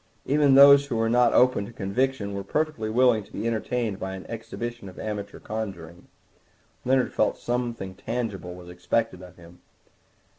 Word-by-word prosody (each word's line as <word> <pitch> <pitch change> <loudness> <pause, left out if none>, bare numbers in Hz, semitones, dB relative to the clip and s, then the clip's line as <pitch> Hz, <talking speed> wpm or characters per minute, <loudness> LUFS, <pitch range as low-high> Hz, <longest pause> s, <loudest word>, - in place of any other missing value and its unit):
Even 145 -1 +4
those 140 0 +8
who 125 - -3
were 115 0 +1
not 120 -1 +4
open 125 -5 +3
to - - -10
conviction 110 +1 -2
were 100 0 -4
perfectly 150 -1 -2
willing 120 -1 +3
to - - -20
be - - -5
entertained 115 -2 -2
by 95 0 -4
an 95 - -9
exhibition 115 -1 -6
of 90 - -15
amateur 105 -2 -5
conjuring. 95 -6 -7 0.8
Leonard 130 0 +1
felt 110 - +1
that - - -22
something 120 -6 -3
tangible 100 -4 -5
was 90 -1 -12
expected 90 +3 -2
of 90 -2 -13
him. 85 0 -16
110 Hz, 170 wpm, -25 LUFS, 95-125 Hz, 0.8 s, those